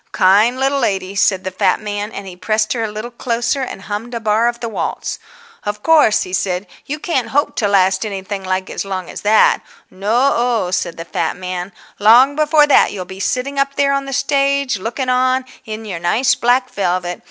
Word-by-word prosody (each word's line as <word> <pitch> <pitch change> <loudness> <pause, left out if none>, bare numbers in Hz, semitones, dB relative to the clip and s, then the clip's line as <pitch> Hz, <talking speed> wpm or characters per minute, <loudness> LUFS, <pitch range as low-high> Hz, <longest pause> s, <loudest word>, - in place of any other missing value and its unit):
"Kind 210 +7 +4
little 275 +1 +1
lady," 195 -5 -1
said 195 -1 +2
the 190 - -4
fat 185 - +1
man, 210 0 -4
and 200 - -7
he 185 -2 -9
pressed 215 +4 0
her 235 -2 -2
a 220 - -3
little 215 +3 -6
closer, 240 +3 -1
and 220 -7 -6
hummed 220 +4 -5
a - - -2
bar 220 +1 +2
of 240 0 -2
the 235 - -4
waltz. 225 - -4 0.4
"Of 210 0 -4
course," 310 -9 +4
he 185 - -9
said, 185 0 -1 0.2
"you 295 - -3
can't 290 -6 -1
hope 290 +2 0
to 210 - +1
last 190 -1 +3
anything 195 -1 -5
like 185 0 -2
as - - -3
long 190 -2 -5
as - - -7
that. 215 +1 +4 0.3
No 225 +8 +1
o," 235 -6 0
said 180 -2 -2
the 165 - -6
fat - - -2
man, 180 0 -5 0.3
"long 240 +7 +6
before 305 0 +4
that 290 - +4
you'll 185 -3 -6
be 190 +1 -10
sitting 265 +7 -2
up 275 0 0
there 280 -1 +2
on 275 0 -1
the 275 - -6
stage, 275 -4 +1
looking 235 +6 -3
on, 255 +1 +2 0.2
in 220 0 -6
your 185 -5 -5
nice 235 +11 +2
black 250 0 +1
velvet. 180 -2 -2
215 Hz, 210 wpm, -17 LUFS, 190-255 Hz, 0.4 s, long